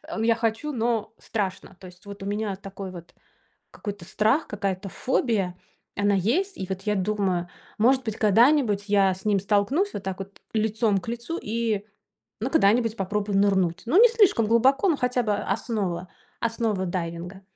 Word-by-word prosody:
ну, 225 - -2
я 230 0 +4
хочу, 225 +6 -1
но 230 -3 -1
страшно. 195 -3 -4
То 185 - -11
есть 180 +2 -16
вот 200 -1 -9
у - - -5
меня 205 0 -2
такой 195 -1 -8
вот 175 -1 -11 0.6
какой-то 205 -4 -7
страх, 220 - +1
какая-то 195 -1 -3
фобия, 205 -8 0 0.4
она 205 0 +2
есть. 340 - 0
И 190 - -4
вот 190 0 -4
я 210 0 0
думаю, 190 -3 0 0.3
может 255 +4 +3
быть, 220 -2 -4
когда-нибудь 220 -1 +4
я 195 -2 +4
с 190 +2 -12
ним 205 -2 +3
столкнусь 210 - +1
вот 200 - -5
так 190 0 -4
вот 195 +1 -9
лицом 215 -2 +1
к 185 - -14
лицу 240 +8 -4
и, 220 -2 -1 0.5
ну, 245 +5 -2
когда-нибудь 230 -4 +3
попробую 200 +1 -1
нырнуть. 190 -3 +2
Ну, 350 - +5
не 485 - +9
слишком 410 - +4
глубоко, 265 - +4
ну, 315 - +2
хотя 250 -1 0
бы 210 - +1
основа 195 -4 -2 0.3
основа 225 -5 -1
дайвинга. 175 +1 -4
210 Hz, 170 wpm, -25 LUFS, 195-230 Hz, 0.6 s, не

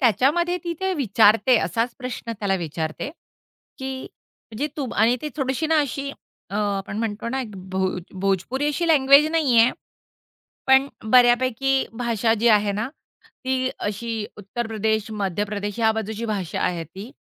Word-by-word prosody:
त्याच्यामध्ये 290 - +3
ती 340 - -2
ते 380 0 0
विचारते, 225 - +4
असाच 230 +9 -1
प्रश्न 250 -2 -5
त्याला 200 -2 0
विचारते, 160 - -4 0.7
की 265 0 -4 0.5
म्हणजे 240 +7 -2
तू 280 -4 -3
आणि 230 +4 +3
ती 300 - -2
थोडीशी 270 +3 -1
ना 320 - +3
अशी 280 0 -3 0.4
अ, 200 - -6
आपण 200 -1 -2
म्हणतो 225 0 -3
ना 265 +2 -1
एक 235 - -6 0.2
भोज 190 -1 -1 0.2
भोजपुरी 195 +9 0
अशी 335 +3 -1
लँग्वेज 280 -1 +6
नाहीये, 255 -8 +4 1.0
पण 265 +1 +5 0.2
बऱ्यापैकी 255 +2 +4
भाषा 230 -2 0
जी 230 +2 +2
आहे 210 -2 +4
ना, 215 +4 -2 0.6
ती 260 0 0
अशी 220 +1 -3
उत्तर 210 +4 -5
प्रदेश, 220 0 -1
मध्य 205 -2 -1
प्रदेश 205 0 -4
ह्या 220 -1 +4
बाजूची 220 +1 -4
भाषा 200 -6 -3
आहे 170 -2 -1
ती 195 - -10
230 Hz, 150 wpm, -23 LUFS, 205-265 Hz, 1.0 s, लँग्वेज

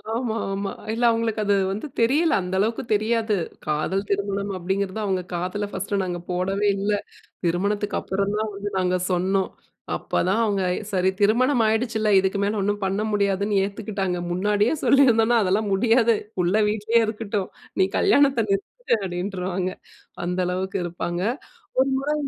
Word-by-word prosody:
ஆமா, 235 -2 -1 0.2
ஆமா. 195 0 -3 0.2
இல்ல 235 +2 -2
அவுங்களுக்கு 225 -1 0
அது 205 0 +3 0.2
வந்து 210 +9 -4
தெரியல. 285 +8 +3
அந்த 180 0 -5
அளவுக்கு 225 +5 0
தெரியாது. 220 +1 +1 0.3
காதல் 155 +6 -1
திருமணம் 200 0 -1
அப்பிடிங்கிறது 190 +3 -2
அவுங்க 190 -2 0
காதுல 185 +4 -2
ஃபர்ஸ்ட்டு 200 +1 -2
நாங்க 175 -1 -3
போடவே 195 +3 0
இல்ல. 200 +2 0 0.5
திருமணத்துக்கு 200 +4 0
அப்புறம் 195 +2 -1
தான் 215 0 -2
வந்து 200 +1 -4
நாங்க 185 -1 +1
சொன்னோம். 190 +2 +1 0.5
அப்போதான் 195 +5 0
அவுங்க 200 -3 0 0.3
சரி 185 -1 +2
திருமணம் 240 +4 +3
ஆயிடுச்சுல்ல. 220 -1 +1
இதுக்கு 190 +1 0
மேல 205 +1 0
ஒன்னும் 205 +1 -1
பண்ண 195 +2 0
முடியாதுன்னு 200 0 +1
ஏத்துக்கிட்டாங்க. 200 -3 -3
முன்னாடியே 205 - +2
சொல்லியிருந்தோனா 240 -4 +5
அதெல்லாம் 200 +2 +1
முடியாது, 230 +3 +4 0.2
புள்ள 175 +1 +2 0.2
வீட்டிலேயே 220 +2 +2
இருக்கட்டும் 210 -3 -3 0.3
நீ 190 - +6
கல்யாணத்தை 280 - +4
நிறுத்திடு 235 - 0
அப்டின்ருவாங்க 185 0 -2 0.5
அந்த 180 +1 -2
அளவுக்கு 190 +2 -2
இருப்பாங்க 175 0 -3 0.6
ஒரு 265 - +3
முறை 290 +3 -1
200 Hz, 140 wpm, -24 LUFS, 190-220 Hz, 0.6 s, நீ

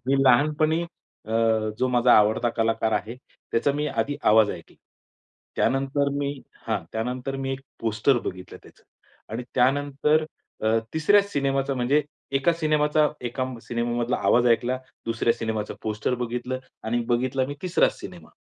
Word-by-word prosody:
मी 135 - +3
लहानपणी 155 +5 +3
अ, 160 -9 -12 0.5
जो 130 0 +1
माझा 120 0 +4
आवडता 110 +3 +4
कलाकार 115 0 +1
आहे 115 +3 -2 0.4
त्याचा 140 +5 +2
मी 150 +1 -1
आधी 145 0 -1
आवाज 110 -1 +5
ऐकला. 85 - -10 0.8
त्यानंतर 135 +1 +1
मी 140 0 -1 0.4
हां. - - -1
त्यानंतर 125 +4 -3
मी 135 0 -3
एक 135 - -5 0.2
पोस्टर 115 +4 +2
बघितलं 90 0 -7
त्याचं. - - -19 0.5
आणि 115 +3 -3
त्यानंतर 145 +4 +2 0.4
अ, - - 0 0.3
तिसऱ्या 200 +6 +5
सिनेमाचा 140 -7 -1
म्हणजे, 130 +4 +2 0.3
एका 140 +5 +3
सिनेमाचा 150 0 +3 0.2
एका 130 +2 -2 0.2
सिनेमामधला 120 +1 -1
आवाज 120 0 +4
ऐकला, 125 +2 0 0.3
दुसऱ्या 115 0 +1
सिनेमाचं 110 -2 -3
पोस्टर 110 +3 -1
बघितलं 125 +2 -3 0.3
आणि 120 +2 0
बघितला 130 +2 +1
मी 145 - -5
तिसराच 180 -1 +2
सिनेमा. - - -10
130 Hz, 140 wpm, -25 LUFS, 115-145 Hz, 0.8 s, आवाज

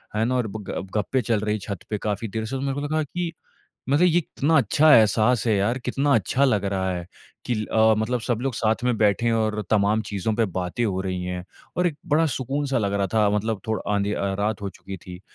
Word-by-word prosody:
है 110 - +2
ना 130 +2 0
और 125 -3 0
ब 105 +1 -7
गप 95 - -4
गप्पे 115 +6 0
चल 115 -1 0
रही 105 0 0
है - - -4
छत 100 -2 -6
पे 105 - -1
काफ़ी 105 +2 -3
देर 110 +2 -4
से 125 +5 -4
तो 130 - -3
मेरे 135 0 -1
को 145 - -3
लगा 155 +2 0
कि 170 +3 -4 0.6
मतलब 145 +6 +4
ये 170 -1 +3
इतना 160 -1 +1
अच्छा 155 0 +5
एहसास 110 +1 +4
है 110 - +3
यार, 105 +6 +1
कितना 140 +3 0
अच्छा 120 +6 +1
लग 105 -7 +1
रहा 95 -1 -1
है 90 -1 -5 0.4
कि 120 - 0
ल 110 0 -2
अ, 110 0 +5
मतलब 115 +3 0
सब 120 -1 -1
लोग 135 0 -1
साथ 110 +2 0
में 125 -1 +2
बैठे 105 +1 +2
हैं 115 - +3
और 110 -1 0
तमाम 105 +1 +3
चीजों 100 +2 -1
पे 115 0 +2
बातें 90 +6 -1
हो 95 -3 -1
रही 95 -1 -3
हैं 90 0 -4 0.3
और 180 0 +3
एक 155 -4 -4 0.2
बड़ा 160 +2 +4
सुकून 135 +3 -2
सा 135 -1 0
लग 100 -3 0
रहा 100 -1 +1
था 105 -2 +4
मतलब 105 0 -1
थोड़ 110 0 0
आँधी 100 0 +1
अ, 100 -1 -1
रात 105 0 -1
हो 100 - -3
चुकी 95 +1 -9
थी 90 0 -11
110 Hz, 255 wpm, -24 LUFS, 100-125 Hz, 0.6 s, अच्छा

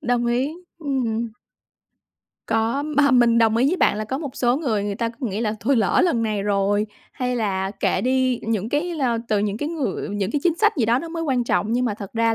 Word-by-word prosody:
Đồng 240 -1 0
ý, 255 +5 0 0.3
ừm. 240 -6 -1 1.2
Có, 225 +5 0
mà 290 -2 +2
mình 240 -2 +5
đồng 225 -1 +3
ý 255 +3 +3
với 365 - +1
bạn 210 - +3
là 215 - -2
có 265 +6 -3
một 285 -5 -6
số 245 +1 +2
người, 225 -10 -1
người 205 -1 -2
ta 230 +2 -1
cứ 235 +2 -5
nghĩ 205 +1 -3
là 215 -2 0
thôi 260 +4 +2
lỡ 210 -5 +3
lần 255 -10 +1
này 215 -3 -1
rồi, 205 +1 +1 0.3
hay 250 -1 -2
là 195 -4 -1
kệ 200 - 0
đi, 255 -1 +1
những 220 -1 -1
cái, 305 +6 -1
ơ 240 -4 +1
từ 210 - +2
những 205 0 -1
cái 295 +6 -3
người 315 -8 -3
những 200 0 -2
cái 295 - -1
chính 340 -2 +3
sách 425 -3 +3
gì 240 - +2
đó 235 +3 +3
nó 330 - -6
mới 330 0 -4
quan 260 -6 0
trọng 220 -1 0
nhưng 250 +1 +1
mà 215 -4 0
thật 200 -2 -9
ra 230 0 +2
235 Hz, 245 wpm, -22 LUFS, 215-270 Hz, 1.2 s, mình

